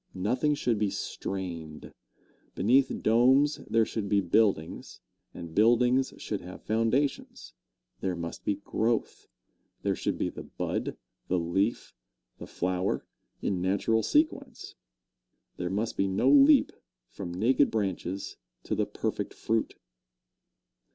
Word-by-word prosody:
Nothing 125 +10 +1
should 120 -6 0
be 105 -1 +1
strained. 85 -7 -5 0.6
Beneath 130 +5 +3
domes 130 +6 +4
there 115 0 +3
should 105 -3 -4
be 100 -1 +3
buildings, 95 -3 0 0.3
and 85 -1 -9
buildings 120 +5 +3
should 105 - -4
have 90 +1 -10
foundations. 115 +6 -1 0.5
There 95 -2 -2
must 85 -1 -6
be 100 - 0
growth. 110 +3 -2 0.6
There - - +1
should - - -2
be - - -1
the - - -8
bud, - - -4 0.3
the 90 - +1
leaf, 95 +7 -1 0.5
the - - -8
flower, 90 +2 -1 0.4
in 95 -3 -1
natural 100 +4 +1
sequence. 280 - 0 0.8
There 90 -1 -3
must 105 +4 -2
be 95 - +2
no 95 +2 +2
leap 285 0 +6 0.4
from 90 -3 -7
naked 120 +10 +3
branches 95 -3 -3 0.3
to - - -3
the - - 0
perfect - - -3
fruit. 115 0 -1
105 Hz, 125 wpm, -28 LUFS, 95-125 Hz, 0.8 s, leap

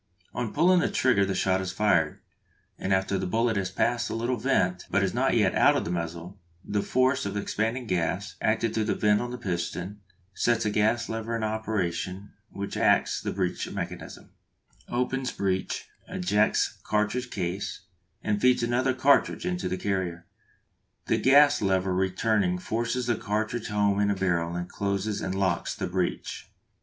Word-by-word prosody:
On 120 -3 -3
pulling 180 +1 +4
the - - +1
trigger 105 -7 +2
the 95 - -1
shot 95 0 +1
is 95 -1 -3
fired, 95 -6 +1 0.6
and 95 - -2
after 95 0 +1
the 95 - -2
bullet 115 +4 +1
has 95 -2 -1
passed 120 +5 0
the - - -4
little 120 +3 0
vent, 100 -7 0
but - - +2
is - - 0
not - - +2
yet - - +3
out - - +5
of - - -2
the 85 - -3
muzzle, 85 +2 -5 0.3
the 105 0 0
force 130 +5 +2
of 100 0 -4
the - - 0
expanding 115 +5 -2
gas, 95 +1 -1
acting 110 +1 +1
through 110 -1 0
the - - 0
vent 105 -1 +3
on 120 - -3
the 125 - -5
piston, 90 0 -4 0.3
sets 115 +3 +1
a 105 - +1
gas 110 +3 +1
lever 115 +1 -3
in 115 - -2
operation 100 -3 -2 0.2
which 100 0 -5
acts - - +2
on - - -2
the - - -8
breech - - -2
mechanism, - - -7 0.6
opens 125 +1 -1
breech, 95 -1 -2 0.2
ejects 105 +4 +1
cartridge 110 +4 -1
case, 95 -1 -3 0.4
and 105 -1 0
feeds 125 -1 +4
another 125 +2 +1
cartridge 140 +2 +3
into 180 0 -2
the 95 - -2
carrier. 90 -3 -2 0.8
The - - +1
gas 145 +2 +6
lever 95 -1 +1
returning 95 0 +1
forces 115 +6 -2
the 120 -2 +1
cartridge 110 +2 -2
home 100 -1 +1
in 105 - +3
the 100 - +1
barrel 85 -3 0
and 90 0 -3
closes 100 +2 -2
and 95 - -2
locks 95 -3 0
the - - -3
breech. 90 0 -3
105 Hz, 175 wpm, -27 LUFS, 95-115 Hz, 0.8 s, gas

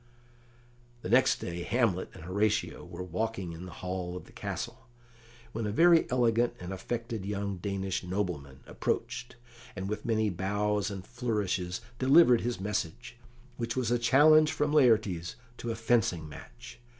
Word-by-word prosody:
The - - -4
next 130 +4 +5
day 85 0 -5
Hamlet 110 -3 0
and - - -11
Horatio 105 +4 0
were 85 +1 -7
walking 95 0 -3
in 85 +3 -8
the - - -9
hall 90 -1 -3
of 90 - -8
the - - -17
castle, - - -6 0.6
when 110 -1 -3
a - - -1
very 170 +7 +5
elegant 120 -1 +2
and 90 +1 -6
affected 115 +2 -4
young 100 -1 -3
Danish 95 0 -3
nobleman 90 -8 -3
approached, - - -3 0.4
and, 95 - -4
with 105 +1 -4
many 110 -2 +1
bows 100 +3 0
and 95 -2 -7
flourishes, 105 -7 -2 0.2
delivered 130 -2 +6
his 120 -2 -2
message, 105 +3 -4 0.4
which 115 -1 -3
was 125 -3 0
a 120 - +2
challenge 155 +5 +6
from 150 0 0
Laertes 110 - +3 0.2
to 120 - -5
a 115 - -1
fencing 110 -8 +1
match. - - -12
105 Hz, 150 wpm, -30 LUFS, 90-120 Hz, 0.6 s, delivered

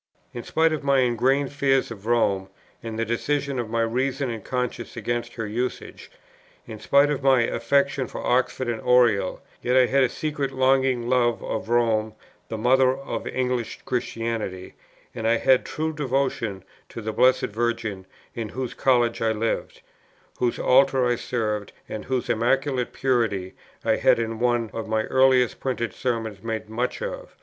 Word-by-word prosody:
In 120 - -5
spite 160 +5 +1
of 155 - -3
my 140 -1 +3
ingrained 130 +3 +1
fears 135 -3 +1
of 105 -1 -9
Rome, 100 -5 +1 0.3
and 115 -1 -6
the 115 - 0
decision 140 +4 -1
of 115 -2 -3
my 115 0 +1
reason 130 +3 -1
and 110 -3 -6
conscience 125 -2 -4
against 120 +1 -3
her 115 - -3
usages, 120 +4 -4 0.6
in 110 -2 -9
spite 140 +5 +4
of 145 -2 -2
my 135 -2 +4
affection 135 +3 +1
for - - -7
Oxford 130 0 +1
and 115 -2 -2
Oriel, 120 -7 +3 0.2
yet 125 +1 +2
I 130 - +6
had 135 +2 +3
a 130 - +2
secret 145 -1 -3
longing 130 -2 +2
love 120 -2 +2
of - - -4
Rome 110 -2 +1 0.3
the 110 - -4
Mother 130 +3 +3
of 135 - -5
English 125 -2 -2
Christianity, 115 -7 -3 0.4
and 115 -2 -3
I 115 +1 +4
had 130 +1 +4
a - - -20
true 160 +1 -3
devotion 130 - -1 0.3
to - - -8
the 110 -1 -4
Blessed 130 -2 +3
Virgin, 110 -4 -2 0.3
in 115 -2 -4
whose 130 +1 -4
College 120 -3 +2
I 115 -1 +2
lived, 110 +1 -3 0.6
whose 120 -1 0
Altar 135 0 +4
I 120 0 +2
served, 105 -4 -3
and 110 - -6
whose 130 -2 -1
Immaculate 125 +2 0
Purity 115 -8 0 0.3
I - - +3
had - - +4
in 115 -1 -3
one 120 -2 +1
of 115 -1 -5
my 110 0 +1
earliest 130 -1 +3
printed 125 -3 -2
Sermons 115 -5 -3
made 110 -1 -4
much 120 - -2
of. - - -6
120 Hz, 170 wpm, -24 LUFS, 115-130 Hz, 0.6 s, I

